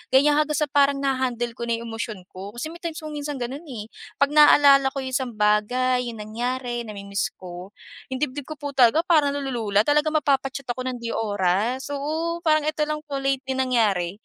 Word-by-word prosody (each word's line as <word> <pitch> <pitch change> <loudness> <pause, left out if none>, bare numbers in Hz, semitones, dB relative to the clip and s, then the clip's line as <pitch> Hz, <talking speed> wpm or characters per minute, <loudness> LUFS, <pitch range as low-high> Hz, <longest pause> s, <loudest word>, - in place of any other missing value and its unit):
ganyan 290 +2 +5
hanggang 305 0 +1
sa 300 - +1
parang 280 -1 +4
na-ha-handle 255 -3 -1
ko - - -5
na 230 -1 0
yung 230 - -7
emosyon 225 -4 -5
ko. 195 +4 -9
Kasi 310 +7 -5
may 340 - -11
times 330 -2 -5
kung 310 - -6
minsan 290 0 -4
ganun 260 +6 -5
eh, 225 -5 -7 0.3
pag 280 +1 +2
naaalala 285 -2 +7
ko 275 - -2
yung 260 - -5
isang 255 -3 -2
bagay, 245 +4 +2
yung 230 -2 -7
nangyari, 240 +2 -3
na-mi-miss 200 -1 -3
ko, 180 +1 -9 0.4
yung 260 - -3
dibdib 285 -1 -4
ko 310 - -6
po 285 -1 -4
talaga 265 +4 +4
parang 295 -5 +3
na-lulula 235 -7 0
talagang 300 +1 +2
mapapa-chat 275 -2 0
ako 255 +1 -4
ng 255 -1 -3
di 230 - -3
oras. 210 +5 0
Oo, 320 +4 -2
parang 310 -3 +3
ito 310 0 -2
lang 305 0 -3
po 280 -2 -4
lately 270 -1 -1
nangyari. 220 -9 +1
260 Hz, 200 wpm, -24 LUFS, 230-290 Hz, 0.4 s, naaalala